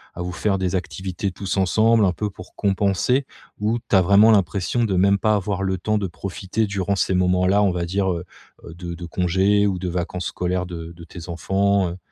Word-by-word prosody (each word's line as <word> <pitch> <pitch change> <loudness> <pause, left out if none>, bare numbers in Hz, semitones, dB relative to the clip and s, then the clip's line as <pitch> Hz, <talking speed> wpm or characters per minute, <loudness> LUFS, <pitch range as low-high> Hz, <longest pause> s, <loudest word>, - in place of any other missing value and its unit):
à 90 - -6
vous 90 0 -3
faire 100 +1 0
des 95 0 -1
activités 95 +1 -3
tous 95 +1 -4
ensemble, 110 +3 +3
un 90 - +2
peu 105 +4 -3
pour 90 -1 -13
compenser? 100 +6 +1 0.3
Ou 110 +3 0
tu - - +3
as 95 - +6
vraiment 100 +4 +6
l'impression 100 +4 +1
de 95 -3 -1
même 100 +2 +4
pas 110 -1 +2
avoir 100 -1 -2
le 95 -1 0
temps 110 +3 0
de 100 -2 -1
profiter 95 +6 -3
durant 100 0 -1
ces 95 -1 0
moments-là, 90 +2 +3
on 95 - +3
va 85 -1 -2
dire, 95 +2 0
heu 85 +1 -4 0.4
heu, 85 - -9
de 85 -1 -6
de 85 0 -8
congés 95 +4 +2
ou 95 -2 -1
de 90 -1 -3
vacances 90 +1 -3
scolaires 90 0 -2
de 85 -1 -7
de 85 0 -13
tes 85 -1 -10
enfants, 95 +2 +1
heu? 90 - -7
95 Hz, 220 wpm, -22 LUFS, 90-100 Hz, 0.4 s, as